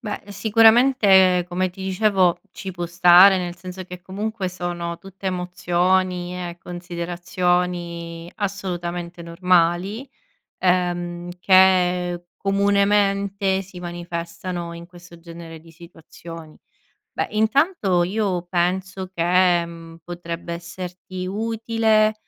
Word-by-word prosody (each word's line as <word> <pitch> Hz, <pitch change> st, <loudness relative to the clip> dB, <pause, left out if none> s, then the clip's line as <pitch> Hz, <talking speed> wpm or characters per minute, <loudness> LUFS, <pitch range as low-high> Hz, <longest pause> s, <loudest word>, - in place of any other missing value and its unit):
Beh, 210 Hz, -3 st, -5 dB
sicuramente, 210 Hz, -4 st, +5 dB
come 185 Hz, +1 st, -1 dB
ti 190 Hz, +2 st, -10 dB
dicevo, 190 Hz, -2 st, +2 dB
ci 195 Hz, -, -7 dB
può 175 Hz, -1 st, -4 dB
stare, 180 Hz, +2 st, +7 dB
nel 175 Hz, -1 st, -4 dB
senso 185 Hz, +1 st, -8 dB
che, 180 Hz, 0 st, -10 dB
comunque, 200 Hz, +1 st, -4 dB
sono 175 Hz, -1 st, -4 dB
tutte 195 Hz, 0 st, -10 dB
emozioni 180 Hz, 0 st, 0 dB
e 175 Hz, -1 st, -6 dB
considerazioni 175 Hz, -1 st, -3 dB
assolutamente 175 Hz, -4 st, -4 dB
normali, 180 Hz, +6 st, +1 dB, 0.5 s
ehm, 175 Hz, -1 st, 0 dB
che, 180 Hz, -2 st, +3 dB
comunemente, 200 Hz, 0 st, +1 dB
si 190 Hz, -1 st, -11 dB
manifestano 175 Hz, 0 st, -5 dB
in 170 Hz, 0 st, -9 dB
questo 175 Hz, -1 st, -15 dB
genere 165 Hz, -1 st, -10 dB
di 165 Hz, -, -17 dB
situazioni. 165 Hz, -1 st, -12 dB, 0.5 s
Beh, -, -, -1 dB
intanto, 220 Hz, -, +2 dB
io 190 Hz, -2 st, -1 dB
penso 185 Hz, +1 st, -1 dB
che, 175 Hz, 0 st, +3 dB
mhmm, 165 Hz, -1 st, -11 dB
potrebbe 170 Hz, -1 st, -6 dB
esserti 180 Hz, +2 st, -7 dB
utile, 220 Hz, +1 st, +1 dB
180 Hz, 100 wpm, -22 LUFS, 175-195 Hz, 0.5 s, stare